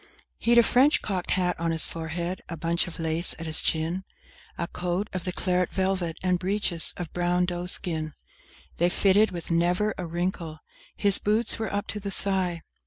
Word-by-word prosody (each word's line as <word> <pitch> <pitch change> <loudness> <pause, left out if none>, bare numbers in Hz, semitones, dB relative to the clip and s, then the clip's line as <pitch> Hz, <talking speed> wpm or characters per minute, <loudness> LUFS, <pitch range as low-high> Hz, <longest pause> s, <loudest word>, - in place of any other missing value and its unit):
II - - -23 0.3
He'd 235 +1 +3
a 235 - +8
French 265 +6 +4
cocked 185 -4 -3
hat 180 -1 +1
on 165 0 0
his 165 -1 +3
forehead, 170 +2 -4
a 170 - -5
bunch 170 +2 0
of 170 - -8
lace 165 +1 +2
at 165 - -7
his 160 -1 +2
chin, 165 +4 0 0.5
A 170 - -1
coat 180 +4 -2
of 185 -1 -4
the 180 - -1
claret 180 0 0
velvet, 185 -3 -1
and 180 -1 +2
breeches 185 -3 +1
of 175 -4 -6
brown 175 0 +1
doe 175 0 -4
skin; 160 -4 -1 0.6
They 175 +1 +3
fitted 200 +3 +4
with 170 -1 -6
never 180 +5 +2
a 180 - -3
wrinkle: 170 -1 -3 0.4
his 200 -2 +5
boots 215 +2 +2
were 220 -2 -3
up 205 +1 -2
to 210 - -3
the 200 0 -4
thigh! 190 -4 -1
180 Hz, 190 wpm, -26 LUFS, 170-195 Hz, 0.6 s, a